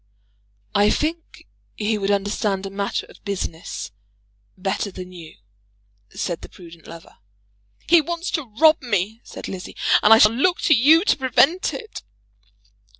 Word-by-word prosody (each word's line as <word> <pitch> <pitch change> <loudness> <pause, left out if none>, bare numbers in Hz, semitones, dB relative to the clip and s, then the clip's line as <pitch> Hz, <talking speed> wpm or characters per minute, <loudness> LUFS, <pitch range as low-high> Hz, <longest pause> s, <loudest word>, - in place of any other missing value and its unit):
"I 205 +1 +4
think 325 +6 -3 0.3
he 210 0 -1
would 195 0 -2
understand 200 -1 -1
a 195 - -6
matter 200 0 -3
of - - -19
business 180 - -5 0.7
better 195 +2 -2
than 185 -1 -9
you," 165 - -12 0.7
said 170 -2 -4
the - - -11
prudent 170 -2 -15
lover. 165 0 -13 0.7
"He 340 0 +6
wants 340 +3 -4
to 280 -9 -4
rob 315 +1 +5
me," 220 -2 -2
said - - -9
Lizzie, 185 -1 -8 0.2
"and 210 - +4
I 225 - +10
shall 215 0 +6
look 350 +9 +1
to 310 - +4
you 310 - +5
to - - +2
prevent 275 +6 +2
it." 445 -3 -8
210 Hz, 150 wpm, -22 LUFS, 190-305 Hz, 0.7 s, I